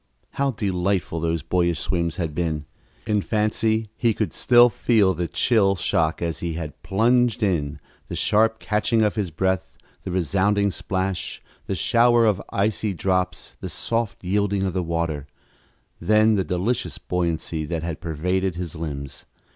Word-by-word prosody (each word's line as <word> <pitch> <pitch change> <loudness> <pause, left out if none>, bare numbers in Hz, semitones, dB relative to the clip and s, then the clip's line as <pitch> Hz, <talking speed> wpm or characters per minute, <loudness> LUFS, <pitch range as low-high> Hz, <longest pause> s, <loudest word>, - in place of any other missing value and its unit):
How 140 0 0
delightful 95 -6 -1
those 80 -1 -1
boyish 85 0 +1
swims 85 -2 -1
had 80 -4 -3
been! 80 -2 -2 0.4
In 105 -2 +1
fancy 110 +1 0
he 115 -2 +1
could 110 - -2
still 120 0 +6
feel 110 -5 +2
the 85 0 -2
chill 100 -3 +3
shock 80 -1 0
as 85 -1 -2
he 85 -1 -3
had 80 -3 -6
plunged 120 +3 +2
in, 75 -7 0 0.3
the - - -5
sharp 110 +1 +3
catching 110 +1 +1
of 105 - +2
his 105 -5 -2
breath, 95 +3 -1 0.2
the - - -6
resounding 100 +3 +1
splash, 95 0 -3 0.3
the 95 - -1
shower 120 +6 +4
of 100 -3 +2
icy 100 0 0
drops, 90 -1 -1
the - - -5
soft 115 -4 -2
yielding 100 +1 0
of 95 -2 -1
the 90 - 0
water 85 -4 -2 0.7
then 110 +1 +4
the 100 -2 +2
delicious 95 +8 -1
buoyancy 85 -2 -2
that 80 +1 -3
had 85 -1 -4
pervaded 90 +3 -1
his 85 -2 -5
limbs. 70 -4 -6
95 Hz, 155 wpm, -23 LUFS, 85-105 Hz, 0.7 s, still